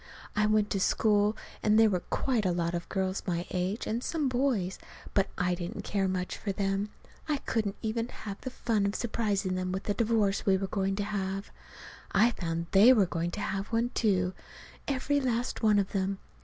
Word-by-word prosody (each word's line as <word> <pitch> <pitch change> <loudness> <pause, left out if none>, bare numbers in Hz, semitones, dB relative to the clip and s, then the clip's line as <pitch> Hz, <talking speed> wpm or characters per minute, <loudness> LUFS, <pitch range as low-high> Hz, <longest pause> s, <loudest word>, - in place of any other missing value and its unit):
I 210 0 +3
went 215 -1 +2
to 195 - +1
school, 210 +1 +3 0.2
and 215 0 +4
there 220 -1 +6
were 180 - +1
quite 240 +5 0
a 185 - +2
lot 170 0 -1
of 170 0 -4
girls 190 -1 -1
my 175 -1 -1
age, 185 +4 -1
and 230 +3 -2
some 310 -4 0
boys; 245 -8 0 0.3
but 195 - +3
I 180 0 +1
didn't 175 0 -5
care 195 -2 0
much 185 -1 -2
for 205 - -2
them. 195 +1 -1 0.4
I 300 - +2
couldn't 215 -6 -1
even 225 +1 -1
have 205 -5 -8
the 255 - -4
fun 220 -5 0
of 200 - -2
surprising 210 -5 0
them 185 0 -2
with 190 +1 -3
the 205 - 0
divorce 215 -2 +1
we 190 -1 +4
were 195 - -2
going 195 0 -1
to 205 - -1
have. 195 -1 -3 0.6
I 220 +5 +5
found 170 -5 -3
they 205 +6 +8
were 210 -6 +4
going 170 -1 -2
to 205 +4 -5
have 195 0 -2
one, 235 +1 0
too 185 -4 +1 0.5
every 285 +1 +1
last 245 -1 -1
one 215 -2 +4
of 195 -1 +1
them. 195 0 -1
200 Hz, 200 wpm, -30 LUFS, 190-220 Hz, 0.6 s, they